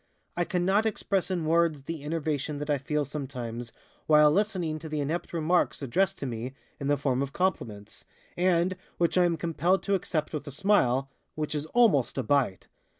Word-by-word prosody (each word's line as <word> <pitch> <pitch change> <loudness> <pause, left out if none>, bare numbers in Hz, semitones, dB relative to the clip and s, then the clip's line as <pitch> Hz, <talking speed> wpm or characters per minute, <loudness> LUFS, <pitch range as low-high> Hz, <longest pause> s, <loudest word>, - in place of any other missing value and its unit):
I 175 - 0
cannot 190 +5 +2
express 195 -3 -1
in 175 -4 -1
words 165 -3 +2
the 160 0 -6
enervation 150 -2 -2
that 150 +1 -3
I 145 - +1
feel 150 +1 -1
sometimes 125 -5 -5 0.4
while 150 -1 +6
listening 180 -4 0
to 160 0 -8
the 150 0 -2
inept 155 +5 -2
remarks 170 -2 +1
addressed 190 +9 +1
to - - -5
me 125 +1 -5 0.2
in 140 - -3
the 145 0 +3
form 135 -2 0
of 140 0 -3
compliments, 110 - -3 0.3
and 180 0 +2 0.2
which 170 -1 +1
I 180 -1 +5
am 170 -1 +1
compelled 170 +3 +1
to 200 - 0
accept 165 -5 -1
with 150 - -4
a - - -5
smile, 135 -7 +2 0.2
which 155 -1 -2
is 150 0 -3
almost 200 - +3
a 135 - 0
bite. 125 -5 +1
155 Hz, 185 wpm, -28 LUFS, 140-175 Hz, 0.4 s, while